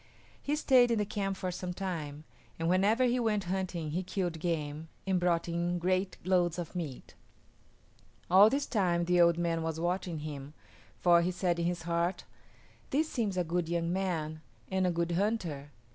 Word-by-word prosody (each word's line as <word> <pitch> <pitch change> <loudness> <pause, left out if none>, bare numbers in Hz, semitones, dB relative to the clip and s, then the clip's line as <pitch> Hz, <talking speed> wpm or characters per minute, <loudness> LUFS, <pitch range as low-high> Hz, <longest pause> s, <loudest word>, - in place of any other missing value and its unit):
He 290 - 0
stayed 255 -5 +5
in 230 - +2
the 210 - +1
camp 195 -1 -2
for 185 -1 -3
some 180 0 -5
time, 155 -6 -4 0.3
and 165 - -1
whenever 200 +7 +3
he 250 0 +2
went 215 -4 +1
hunting 180 -4 -3
he 175 +4 -1
killed 180 -3 -3
game 155 -2 -3 0.2
and 190 -2 +1
brought 175 -1 +1
in 170 +1 -1
great 185 +2 0
loads 180 -2 +2
of 175 0 -6
meat. 155 -8 -6 1.1
All 195 +4 +7
this 275 +3 0
time 175 -6 +1
the 175 0 +4
old 170 -1 +5
man 170 -1 0
was 160 0 -3
watching 175 -2 -2
him, 145 -1 -7 0.4
for 175 -1 +5
he 175 - +1
said 180 -1 0
in 170 - 0
his 175 -1 -2
heart, 170 +2 -1 0.7
"This 310 +3 +1
seems 210 -7 -1
a 180 - +2
good 170 0 -1
young 170 0 0
man 160 -5 -2 0.3
and 190 -1 +2
a - - +2
good 170 0 -1
hunter. 170 -7 -1
175 Hz, 180 wpm, -31 LUFS, 170-190 Hz, 1.1 s, All